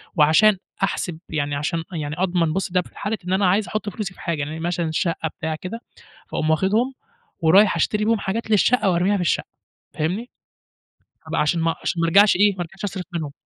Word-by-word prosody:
وعشان 180 +7 +5 0.3
أحسب 175 -4 -2
يعني 145 -2 -1
عشان 160 +3 -2
يعني 150 -2 -3
أضمن، 175 -4 +1
بُصّ 190 -2 -2
ده 180 0 +2
في - - -16
حالة 210 +2 -2
إن 185 - 0
أنا 190 +1 +2
عايز 200 +1 +2
أحط 215 +2 -3
فلوسي 195 -1 -5
في - - -15
حاجة، 165 -4 -2
يعني 155 +3 -4
مثلًا 170 -1 -1
الشقّة 165 0 -1
بتاع 160 -1 -2
كده، 195 +8 -7 0.5
فأقوم 155 - -2
واخدهم 210 +11 +2 0.5
ورايح 190 +5 +5
أشتري 210 +6 0
بيهم 225 -1 +2
حاجات 220 +4 -3
للشقّة 215 +1 +3
وأرميها 185 +3 +2
في 190 - -1
الشقّة، 170 - 0 0.5
فاهمني؟ 190 +11 -2 1.0
أبقى - - 0
عشان 165 +3 +1
ما 165 0 +1
عشان 170 - -1
ما 165 - +2
ارجعش 200 +3 +6
إيه، 205 0 +4
ما 180 - -5
ارجعش 190 +3 -8
أصرف 190 -2 -4
منهم. 155 -4 -3
180 Hz, 195 wpm, -22 LUFS, 160-205 Hz, 1.0 s, ارجعش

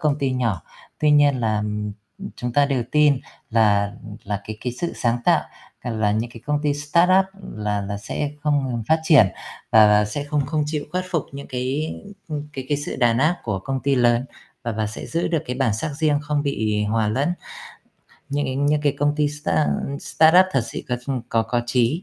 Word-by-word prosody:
công 150 -1 +1
ty 135 -3 0
nhỏ. 115 -10 -1 0.4
Tuy 150 - +3
nhiên 145 -3 +4
là 110 -2 0 0.7
chúng 120 -1 -4
ta 145 +2 +4
đều 135 -4 0
tin 150 -3 +4 0.3
là 100 -3 +3 0.3
là 100 0 -3
cái 110 - -6
cái 125 - -3
sự 170 +8 -3
sáng 120 0 0
tạo, - - +4 0.4
là 110 -4 0
những 110 +3 -1
cái 115 - -12
công 150 0 +1
ty 145 -1 +1
startup 170 +6 +3 0.3
là 105 -1 -1
là 100 +1 -4
sẽ 145 +7 -3
không 145 -3 +1
ngừng 120 -2 -2
phát 160 0 +4
triển, 150 - +6 0.4
và 110 -1 +7
và 105 0 +5
sẽ 105 +8 -4
không 145 -1 -1
không 155 +1 0
chịu 150 -1 -2
khuất 185 0 -1
phục 165 -5 0
những 140 0 -8
cái 130 +5 -2 0.6
cái 135 -2 -5
cái 145 - +1
sự 145 - -5
đàn 120 -1 +3
áp 155 +6 +3
của 105 -4 -1
công 135 +7 -3
ty 140 +1 +1
lớn, 120 -1 +3 0.4
và 115 -1 -2
và 110 0 -1
sẽ 105 - -7
giữ 165 +1 -1
được 165 -3 0
cái 125 - -3
bản 130 -6 +1
sắc 110 +8 -3
riêng, 150 -2 +2
không 145 0 -1
bị 110 -7 0
hòa 110 0 +1
lẫn 140 +10 0 1.0
những 145 +1 -1
cái 130 0 -3
những 145 +2 +2
cái 145 -2 +2
công 145 +1 +2
ty 150 -1 +2
start 115 - 0 0.3
startup 165 +4 +5
thật 135 - +2
sự - - -6
có 125 - 0 0.3
có 115 - +2
có 120 +2 -1
chí. 125 +7 +1
130 Hz, 205 wpm, -22 LUFS, 110-150 Hz, 1.0 s, và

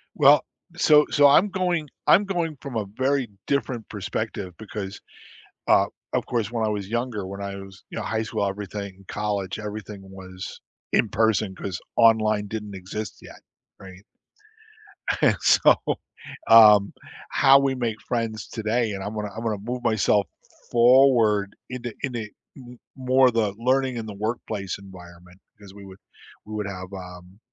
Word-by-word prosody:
Well, - - +6 0.3
so 150 -1 +5
so 145 -1 +5
I'm 170 +9 +5
going 180 -5 -1 0.2
I'm 200 +4 +6
going 170 -6 -2
from 140 -4 -7
a 105 - -1
very 135 -1 +1 0.2
different 130 -5 -2
perspective 105 -2 -4
because, 105 -2 -7 0.7
uh, - - +5 0.3
of - - 0
course, 115 -3 -2
when 115 -2 -1
I - - 0
was 100 -2 -3
younger, 115 -3 -3
when 100 +1 -7
I 100 0 -5
was, 95 -1 -11
you - - -8
know, 115 - -3
high 110 +3 -1
school, 110 -2 -2
everything 100 -1 -6
college, 100 -2 -3
everything 105 -1 -7
was 95 -1 -10 0.3
in 110 - +3
person 110 -2 +1
'cause 90 -1 -5 0.2
online 110 -2 +4
didn't 105 -1 -6
exist 95 +3 -6
yet, - - -13 0.4
right? 95 +1 -13 1.2
And - - +4
so, - - +5 0.7
um, 105 -3 +8 0.4
how 135 -1 +6
we 135 -1 +1
make 115 -3 -3
friends 115 -3 -3
today 110 +1 -1
and 95 -1 -5
I'm 105 - -5
gonna 105 -1 -4
I'm 115 - -6
gonna 110 -2 -1
move 120 +4 -5
myself 105 -2 +2 0.4
forward 120 -5 +4
in 125 -1 -6
a 120 - -6
in 130 -3 -2
a 110 -3 -4 0.3
m 125 -2 -12 0.2
more 130 -1 +3
the 110 -4 0
learning 130 +1 +1
in 115 - -4
the 105 - -7
workplace 105 -2 -4
environment 90 -1 -14 0.2
because 100 -2 -14
we 100 0 -12
would 95 0 -13 0.5
we 110 - -9
would 105 -1 -3
have, 95 -1 -7
um, 90 0 -10
110 Hz, 160 wpm, -24 LUFS, 100-120 Hz, 1.2 s, um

